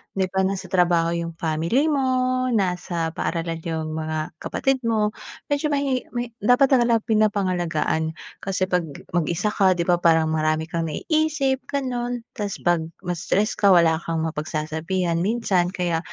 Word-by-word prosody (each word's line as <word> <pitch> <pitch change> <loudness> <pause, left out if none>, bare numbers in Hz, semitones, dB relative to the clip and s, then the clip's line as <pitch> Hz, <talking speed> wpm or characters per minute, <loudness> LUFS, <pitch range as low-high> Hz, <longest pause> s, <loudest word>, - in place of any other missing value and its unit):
Di 190 -1 0
ba 190 0 +2
nasa 190 -1 -4
trabaho 175 -3 +3
yung 170 -1 -3
family 165 - +1
mo, 255 -2 +1
nasa 180 -7 -1
paaralan 165 0 -3
yung 160 -1 -3
mga 155 0 -3
kapatid 270 -1 0
mo, 215 -2 +2 0.4
medyo 290 +1 +1
mahi 280 -3 0
may 240 0 -2
dapat 245 +6 +4
talaga 235 -4 +4
pinapangalagaan. 180 -7 0 0.2
Kasi 190 -1 -2
'pag 180 -3 0 0.2
mag-isa 175 +4 0
ka 190 -3 +3
'di 170 - 0
ba? 175 0 +2
Parang 160 -2 +3
marami 155 +1 0
kang 165 -1 -1
naiisip 300 - 0
ganun. 245 -3 -2
Tapos 205 -2 -4
'pag 175 -1 +3 0.2
ma-stress 180 +4 -1
ka 200 - +4
wala 165 -2 +4
kang 165 -1 -2
mapagsasabihan 160 +3 -2
minsan 190 -2 +1
kaya 180 -3 -1
180 Hz, 145 wpm, -23 LUFS, 165-235 Hz, 0.4 s, dapat